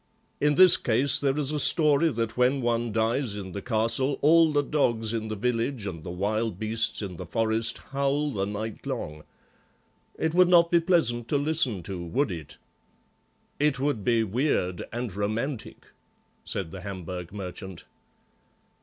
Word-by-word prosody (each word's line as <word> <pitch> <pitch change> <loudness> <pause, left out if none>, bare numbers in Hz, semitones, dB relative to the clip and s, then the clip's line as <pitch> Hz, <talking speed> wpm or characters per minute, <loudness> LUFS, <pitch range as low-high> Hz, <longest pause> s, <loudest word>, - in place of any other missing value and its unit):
In 150 0 +2
this 185 +2 +9
case 125 +4 +3
there 140 0 0
is 150 -1 0
a 150 - -2
story 150 +1 +4
that 115 -4 -3
when 125 +1 +3
any 140 - -3
one 120 -1 0
dies 115 +1 0
in 95 -2 -7
the 100 - -6
castle 115 +4 +1
all 165 +1 +5
the 145 -1 +1
dogs 115 -7 0
in 110 -1 -3
the 110 - -4
village 115 +1 -2
and 85 -5 -6
the - - -7
wild 105 +3 -2
beasts 110 +1 -1
in 90 -4 -6
forest 110 +3 0
howl 140 +2 0
the 100 -5 -2
night 105 +1 -6
long. 75 0 -5 0.9
It 160 0 -1
would 180 +1 +5
not 170 -1 +5
be 170 - +5
pleasant 160 -10 +1
to 145 - +1
listen 140 - 0
to, 90 0 -6
would 130 - -1
it?" 80 -5 -8 1.0
"It 145 -3 +1
would 135 -6 -1
be 115 -1 +2
weird 105 - -1
and 120 -4 -5
romantic," 110 +6 -4 0.6
said 90 -5 -3
the 95 - -8
Hamburg 90 -3 -7
merchant. 95 -2 -8
115 Hz, 165 wpm, -26 LUFS, 100-140 Hz, 1.0 s, this